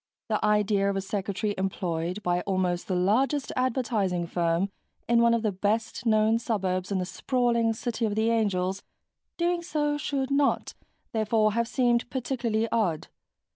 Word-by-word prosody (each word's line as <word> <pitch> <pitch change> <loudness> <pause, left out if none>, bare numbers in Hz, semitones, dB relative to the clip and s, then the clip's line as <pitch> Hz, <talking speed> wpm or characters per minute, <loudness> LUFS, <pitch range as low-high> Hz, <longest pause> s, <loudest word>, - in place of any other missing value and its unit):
The 215 - 0
idea 210 -1 +2
of 200 - -1
a 195 - 0
secretary 200 +1 -2
employed 180 0 -2
by 175 0 +1
almost 185 -2 -1
the 185 - -1
largest 255 +10 +1
advertising 225 -9 0
firm 170 +3 0 0.4
in 235 0 +4
one 235 0 +5
of 230 - -1
the 215 - +1
best 215 +5 -1
known 220 +1 +3
suburbs 185 -5 -1
in 195 - +1
the 180 - -1
sprawling 235 +1 +1
City 230 +1 -2
of 210 -2 -1
the 220 +1 +2
Angels 195 -4 0 0.6
doing 345 0 +1
so 295 -3 -1
should 275 -2 -2
not, 280 0 +1 0.4
therefore, 215 -1 +2
have 235 +1 0
seemed 240 -1 +1
particularly 240 -3 -1
odd. 180 -9 0
215 Hz, 155 wpm, -27 LUFS, 190-235 Hz, 0.6 s, one